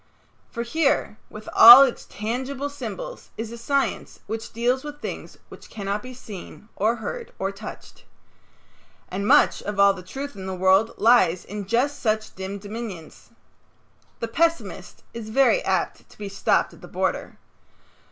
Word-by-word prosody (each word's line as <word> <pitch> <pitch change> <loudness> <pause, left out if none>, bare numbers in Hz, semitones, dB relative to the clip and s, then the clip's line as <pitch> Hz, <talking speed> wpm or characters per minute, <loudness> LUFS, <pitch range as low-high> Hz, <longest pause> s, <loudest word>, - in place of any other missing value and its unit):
For 235 - -4
here, 275 -4 0
with 215 0 -11
all 240 +4 +11
its 260 -3 -2
tangible 260 +6 -4
symbols, - - -7
is 225 0 -5
a 235 - -8
science 275 +3 -2
which 225 +2 -6
deals 245 +3 0
with 295 0 -8
things - - -7
which - - -13
cannot 200 -1 -3
be 255 - -9
seen 210 -2 -11
or 220 +3 +1
heard 465 - -6
or 195 +1 -2
touched. 205 +2 -11 1.1
And 200 +2 -3
much - - +4
of 205 -1 -5
all 200 0 +6
the 190 - -9
truth 275 +10 -7
in 190 -1 -7
the 190 - -4
world 190 +4 +3
lies 190 -7 +4
in 205 -1 -7
just 260 +7 0
such 215 -1 -1
dim 190 +1 -6
dominions. 205 -5 -8 0.9
The 230 - -1
pessimist 330 +7 -2
is 225 -2 -7
very 275 - +3
apt - - -2
to - - -19
be 205 -1 -6
stopped 200 - +1
at - - -17
the - - -11
border. - - -3
225 Hz, 160 wpm, -24 LUFS, 200-260 Hz, 1.1 s, all